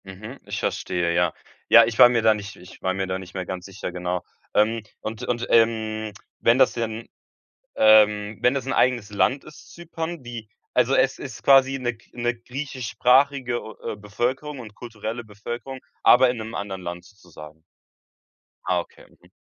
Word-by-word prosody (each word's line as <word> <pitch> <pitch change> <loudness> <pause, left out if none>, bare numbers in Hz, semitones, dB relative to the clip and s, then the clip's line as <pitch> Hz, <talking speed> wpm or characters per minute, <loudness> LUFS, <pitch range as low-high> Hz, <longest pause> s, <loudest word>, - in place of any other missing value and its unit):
Mhm, 105 +7 -10
ich - - -4
verstehe, 85 -2 -1
ja. 85 -1 +2 0.4
Ja, 115 0 +9
ich 115 -1 -4
war 120 - +10
mir 120 -1 +1
da 110 -1 +6
nicht 100 -2 -7
ich 90 - -15
war 95 - 0
mir 95 0 -2
da 95 0 -2
nicht 90 -1 -11
mehr 95 -1 -3
ganz 90 0 -6
sicher, 95 -1 -6
genau. 90 0 -3 0.3
Ähm, 110 +2 +2 0.2
und 110 +2 -6
und, 120 -1 -2
ähm, 110 -1 +2 0.3
wenn 115 +2 +4
das 130 -1 +4
denn, 115 -1 -4 0.7
ähm, 105 -1 +5
wenn 125 - +4
das 135 -2 -3
'n 135 - -1
eigenes 120 -4 +2
Land 130 +7 +1
ist, 155 - -15
Zypern, 170 -2 -6
wie 120 -3 -8 0.3
also 125 +1 +2
es 135 - +2
ist 135 - -8
quasi 135 0 +5
'ne 120 -1 -1
g 115 - -26
'ne 120 0 -1
griechischsprachige 125 0 0
o 110 - -10 0.2
äh, - - -8
Bevölkerung 125 +8 -3
und 105 -4 -10
kulturelle 115 0 -6
Bevölkerung, 120 +5 -7 0.2
aber 130 +1 +7
in 125 - -2
'nem 110 0 -7
anderen 95 -2 -5
Land 85 0 -6
sozusagen. 80 -6 -14 1.1
Ah, 90 -1 +2
okay. - - -16 0.2
Mhm. - - -22
115 Hz, 180 wpm, -24 LUFS, 100-125 Hz, 1.1 s, war